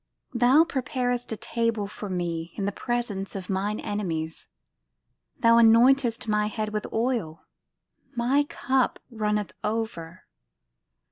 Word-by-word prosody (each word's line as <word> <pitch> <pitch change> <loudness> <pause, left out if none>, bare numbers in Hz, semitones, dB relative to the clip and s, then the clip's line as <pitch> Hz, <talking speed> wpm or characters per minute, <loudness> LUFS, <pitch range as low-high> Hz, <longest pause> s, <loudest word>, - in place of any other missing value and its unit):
Thou 250 +6 +5
preparest 245 -5 -2
a 220 - -3
table 230 -2 -1
for 205 0 -7
me 170 -2 -3
In 200 - -2
the 200 - 0
presence 215 -4 -3
of 190 0 -5
mine 200 +3 -1
enemies. 165 -6 -3 0.9
Thou 230 0 +5
anointest 235 +1 +5
my 210 0 +2
head 215 0 -3
with 210 -1 -4
oil; 225 -9 -1 0.7
My 250 +4 +3
cup 260 -1 +1
runneth 210 -2 -1
over. 210 -6 -4
220 Hz, 120 wpm, -26 LUFS, 195-240 Hz, 0.9 s, Thou